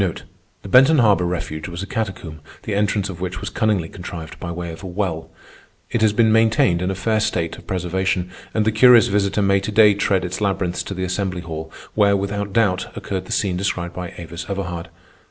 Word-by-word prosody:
The - - -8
Benton 135 +9 +6
Harbor 105 -7 +4
refuge 80 -3 -4
was 85 +1 -5
a - - -4
catacomb, 95 -7 -4 0.2
the 105 - -3
entrance 100 0 +1
of 90 -3 -8
which 90 0 -3
was 100 -2 -5
cunningly 105 -6 +1
contrived 85 -3 -8
by 85 - -5
way 85 0 -5
of 80 - -10
a 95 - -7
well. 90 -3 -3 0.6
It 115 - 0
has 110 -1 +4
been 110 +1 +3
maintained 110 -6 +3
in 90 - 0
a 95 - -2
fair 110 +3 0
state 85 -6 -1
of - - -16
preservation, 90 0 -1 0.2
and 110 -1 0
the 110 - +3
curious 120 0 +6
visitor 100 0 +1
may 100 0 +3
to 100 +2 -4
day 105 -1 +6
tread 95 -2 +1
its 90 +4 -4
labyrinths 95 -3 0
to 100 - -5
the 95 - -3
assembly 95 0 -2
hall, 80 -2 -7 0.2
where, 100 -2 +4
without 100 +1 -3
doubt, 95 -4 +1
occurred 95 -2 -4
the - - -10
scene 95 -3 0
described 90 -2 -2
by 90 -1 -6
Avis 85 0 -7
Everhard. 90 -4 -4
95 Hz, 210 wpm, -21 LUFS, 90-105 Hz, 0.6 s, Benton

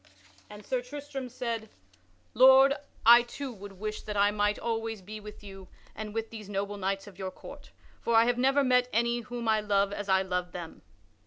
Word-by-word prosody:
And 210 -1 -12
Sir 255 -1 -1
Tristram 270 0 -7
said: 230 -3 -4 0.6
"Lord, 265 +2 +7 0.3
I 235 +1 +9
too 245 +2 -7
would 200 -1 -10
wish 215 +3 -5
that 210 -1 -5
I 205 +1 +4
might 205 0 +1
always 225 -1 -3
be 210 +3 -9
with 210 0 -11
you 195 -2 -11 0.3
and 215 -1 -6
with 225 +1 -4
these 215 -3 -9
noble 200 0 -3
knights 195 0 -2
of 200 -2 -14
your 190 -1 -3
court, - - -12 0.3
for 235 - 0
I 225 +1 +6
have 245 0 +1
never 270 +2 +3
met 250 -1 +3
any 235 +2 +1
whom 240 0 -6
I 220 -1 +3
love 200 -1 +1
as 205 -1 -5
I 190 0 +4
love 180 -1 -3
them." 170 -2 -8
215 Hz, 195 wpm, -29 LUFS, 200-240 Hz, 0.6 s, I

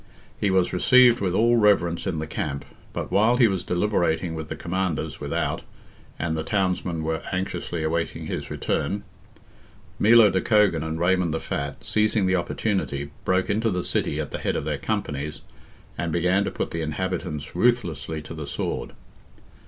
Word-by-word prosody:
He 105 - +1
was 95 -1 +2
received 120 +5 +6
with 95 -2 0
all 120 +3 +4
reverence 95 -6 +3
in 80 - -1
the 80 - -2
camp, 70 -2 -4 0.3
but - - -5
while 110 +5 +4
he 120 -3 +6
was 95 -4 -1
deliberating 90 -3 0
with 80 -1 -5
the - - -3
commanders 90 -2 -2
without, - - -1 0.6
and 80 -1 -1
the 80 - -1
townsmen 90 -3 -1
were 80 0 -1
anxiously 90 -3 -3
awaiting 80 +1 -2
his - - -4
return, 100 0 -2 1.0
Milo 110 -1 +7
de 95 - +1
Cogan 105 -8 +3
and 80 0 -3
Raymond 90 -2 +2
the - - -1
Fat, 70 -8 -4
seizing 105 -1 +2
the 95 0 +2
opportunity, 85 -6 -2
broke 95 0 +2
into 110 +2 +1
the 90 -3 -1
city - - 0
at - - -4
the - - -4
head - - -1
of - - -2
their 75 -2 -2
companies, 75 -5 -3 0.6
and 85 0 -1
began 90 +4 +2
to - - -1
put - - -4
the 85 - -3
inhabitants 80 -1 -3
ruthlessly 85 - 0
to 85 - -8
the 75 -3 -6
sword. - - -3
90 Hz, 170 wpm, -25 LUFS, 80-100 Hz, 1.0 s, Milo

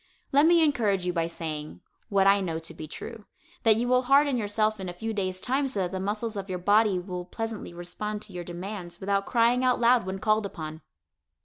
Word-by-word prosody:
Let 285 +3 +5
me 340 -1 +6
encourage 215 - +1
you 180 - 0
by 165 -1 0
saying, 155 -3 -6 0.3
what 195 -1 +3
I 200 0 +5
know 165 -4 -2
to 165 0 -8
be 155 -1 -8
true, 220 +7 -8 0.4
that 225 -3 +5
you 235 +3 0
will 250 0 +4
harden 275 +2 +4
yourself 215 -1 0
in 185 -1 -4
a - - -5
few 220 +5 -4
days' 185 -3 -2
time 270 +6 0
so 230 -7 -1
that 180 - -1
the 190 - -3
muscles 210 +3 -2
of 200 -1 -5
your 185 - -2
body 205 +2 +3
will 180 -1 -5
pleasantly 225 +1 -5
respond 195 +5 -5
to 195 - -10
your 175 -1 -5
demands 175 +1 -7
without 200 0 0
crying 240 +1 +3
out 250 -1 +3
loud 235 -3 +4
when 190 0 -3
called 215 +1 +1
upon. 155 -3 -7
200 Hz, 220 wpm, -27 LUFS, 180-230 Hz, 0.4 s, me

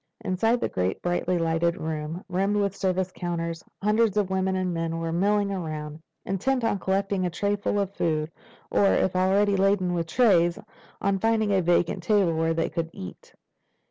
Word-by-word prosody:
Inside 225 +6 +1
the - - 0
great 90 0 -2
brightly 175 0 0
lighted 165 +1 +1
room, 160 +2 -4
rimmed 195 +3 0
with 200 -2 0
service 185 -1 -1
counters, 170 -2 -4 0.2
hundreds 210 0 +2
of 200 -2 +1
men 190 0 0
and 185 -1 -1
women 165 0 -2
were 165 0 -2
milling 200 +3 +1
around, 155 -4 -5 0.2
intent 245 +7 0
on 225 -3 +1
collecting 195 0 0
a 180 - 0
trayful 205 +3 -1
of 200 -1 -2
food 155 -3 -1 0.4
or, 200 - +3
if 185 - +1
already 195 +2 +3
laden 190 -2 +2
with 170 -1 -1
trays, 175 -6 +3 0.5
on 195 0 +1
finding 220 0 +1
a 190 - +3
vacant 175 +1 +1
table 190 -2 +2
where 165 0 +1
they 165 - 0
could 165 0 -3
eat. 90 - -10
185 Hz, 175 wpm, -26 LUFS, 165-200 Hz, 0.5 s, or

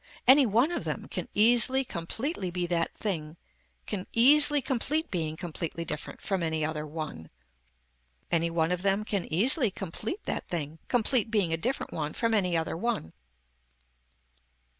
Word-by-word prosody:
Any 265 0 +8
one 235 - +2
of 345 - -3
them - - -4
can - - -4
easily 240 +5 +4
completely 200 - -3
be 175 0 -2
that 170 -1 0
thing 165 -6 -3 0.5
can 195 -3 -4
easily 295 +5 +6
complete 280 +5 -1
being 160 -3 -2
completely 170 -1 -5
different 150 -1 -6
from 195 -3 -1
any 160 -2 0
other 155 -1 -4
one. 150 - -6 1.0
Any 170 0 +2
one 165 0 0
of 180 0 -1
them 200 +2 +1
can 200 -6 -2
easily 240 - +4
complete 200 - -5
that - - -3
thing 160 -2 -4
complete 240 -1 +1
being 200 -7 +1
a - - +3
different 250 +11 -3
one 150 -1 -3
from 230 -1 0
any 180 -5 +2
other 160 0 -2
one. 170 - -3
190 Hz, 155 wpm, -28 LUFS, 165-240 Hz, 1.0 s, Any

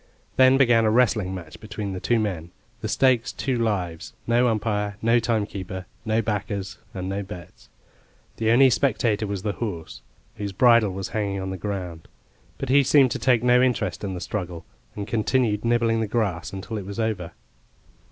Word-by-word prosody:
Then 130 0 +6
began 120 -4 +4
a 110 - +3
wrestling 110 -5 +2
match 85 -4 -9
between 105 -2 -5
the 90 - -4
two 120 +4 +1
men, 90 -6 -3 0.3
the 110 - -4
stakes 125 +1 +2
two 130 -2 -2
lives, 90 -8 -2
no 120 +2 +3
umpire, 105 -2 -1
no 115 +1 +3
timekeeper, 100 -5 -3 0.2
no 110 +1 +1
backers, 100 -2 -3
and 95 -1 -5
no 100 +1 -2
bets. 85 -9 -11 0.7
The 110 0 0
only 130 +3 +6
spectator 110 -5 +1
was 100 -2 -4
the 105 - 0
horse, 85 - -6 0.4
whose 100 -1 -4
bridle 115 0 +5
was 95 0 -5
hanging 100 -3 -2
on 95 0 -4
the - - -4
ground. 90 -4 -5 0.5
But 135 - -5
he 140 +2 +6
seemed 135 -1 +4
to - - -2
take 125 -3 +3
no 125 0 +5
interest 125 -4 0
in 95 -2 -3
the 90 - -6
struggle, 90 -3 -5 0.3
and 100 - -4
continued 110 -1 0
nibbling 115 -1 +2
the 110 - -1
grass 100 -5 -1
until 100 +3 -5
it 95 - -8
was 100 +2 -6
over. 105 -7 -2
105 Hz, 180 wpm, -24 LUFS, 95-115 Hz, 0.7 s, Then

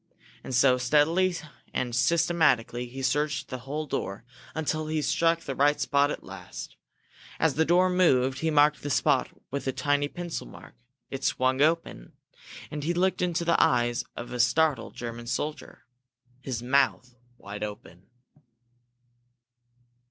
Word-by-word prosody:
And 130 - -4
so, 125 0 +4
steadily 160 +8 +3 0.4
and 120 -2 -1
systematically, 135 -5 +2
he 135 +2 -7
searched 145 +4 0
the 130 - -5
whole 145 +5 -4
door, 100 -6 -4 0.3
until 155 0 -2
he 155 0 -1
struck 165 +2 +1
the 135 - -5
right 145 +2 +2
spot 140 0 +2
at - - -5
last. 95 -1 -9 0.6
As 160 -3 +3
the 160 +3 +2
door 180 +3 +4
moved, 135 -8 +2
he 160 - 0
marked 150 -1 +4
the 145 - -4
spot 140 - +2 0.2
with 140 0 -4
a - - +2
tiny 145 +2 0
pencil 175 - -6
mark. - - -13 0.4
It 135 0 -5
swung 130 -1 +1
open 155 - 0 0.6
and 150 -1 -4
he 170 +3 -1
looked 185 +1 +1
into 175 -1 0
the 170 0 +3
eyes 120 -1 +2
of 120 - -7
a 125 - -5
startled 135 +1 +2
German 120 0 -6
soldier, 150 +6 -4 0.6
his 125 -3 -4
mouth 130 -1 +1 0.2
wide 100 0 -8
open! 100 -4 -8
140 Hz, 145 wpm, -27 LUFS, 125-160 Hz, 0.6 s, so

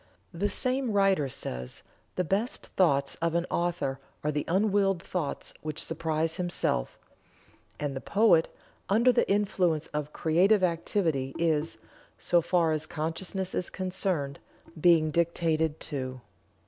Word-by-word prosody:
The 200 +5 0
same 255 -1 0
writer 195 -8 +3
says: 60 - -6 0.3
"The 180 - +1
best 200 +8 -1
thoughts 140 -7 +2
of 170 0 0
an 170 0 +1
author 170 -6 -1 0.2
are 150 - +1
the 150 0 -2
unwilled 195 0 +2
thoughts 170 -6 -3
which 155 -1 -5
surprise 160 0 -1
himself; 175 - -1 0.8
and 145 -2 -2
the 135 - -4
poet, 200 -6 +4 0.4
under 230 +5 +5
the - - +1
influence 185 -6 +1
of 150 0 -3
creative 185 +7 +3
activity, 165 -6 0
is, 160 -1 0 0.4
so 175 - +2
far 170 -1 +2
as 155 0 -1
consciousness 180 +4 -3
is 180 - -2
concerned, 185 -7 -2 0.4
being 160 -2 +5
dictated 160 -1 +1
to." 130 -4 -4
170 Hz, 130 wpm, -28 LUFS, 150-190 Hz, 0.8 s, under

